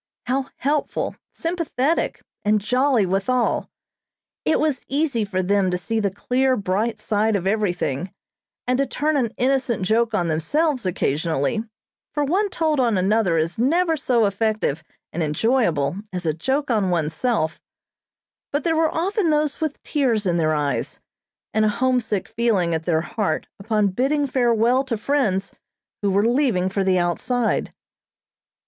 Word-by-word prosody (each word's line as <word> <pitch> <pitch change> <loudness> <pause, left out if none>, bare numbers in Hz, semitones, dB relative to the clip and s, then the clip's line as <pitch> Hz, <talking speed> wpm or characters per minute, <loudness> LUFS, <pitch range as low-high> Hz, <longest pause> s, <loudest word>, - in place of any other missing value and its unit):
How 265 +2 -1
helpful, 290 +2 -1 0.2
sympathetic, 330 -3 -1 0.2
and 210 +1 +3
jolly 250 +1 +2
withal. 200 +7 0 0.8
It 315 - +2
was 300 -5 0
easy 275 -5 0
for 190 -2 -2
them 195 0 +2
to 180 - 0
see 225 +5 -2
the 205 -2 +1
clear, 255 +6 +1
bright 205 +4 -1
side 215 +1 +1
of 190 -2 -1
everything, 185 -6 -1 0.5
and 250 +1 +1
to 275 - +2
turn 310 +1 0
an 245 -6 +1
innocent 255 -5 +1
joke 225 +3 +2
on 175 -5 +1
themselves 255 - 0
occasionally; 165 +3 0 0.5
for 295 - +1
one 380 +8 +1
told 315 -5 0
on 235 -5 +2
another 190 -2 +2
is 165 +5 -1
never 325 +7 +2
so 245 -6 +2
effective 200 -6 0 0.3
and 170 - -2
enjoyable 160 - +1
as 180 -2 -5
a 155 - +1
joke 265 - -1
on 210 -5 +2
oneself; 160 +2 0 0.9
but 290 0 -1
there 325 -1 +1
were 320 0 +3
often 370 +2 0
those 300 -1 +1
with 310 -2 -3
tears 245 -8 0
in 175 -2 +1
their 155 -2 +2
eyes, 145 -2 -2 0.5
and 220 - +2
a 215 - +4
homesick 235 -3 0
feeling 220 -7 +1
at 160 0 -2
their 160 -2 +2
heart 170 -2 -2
upon 210 0 +1
bidding 275 +8 +1
farewell 245 -1 +2
to 245 -4 -2
friends 210 -6 0 0.5
who 200 - +1
were 200 +2 +2
leaving 235 -7 +2
for 195 +1 -1
the 190 -1 +2
outside. 220 +7 0
225 Hz, 150 wpm, -22 LUFS, 185-270 Hz, 0.9 s, a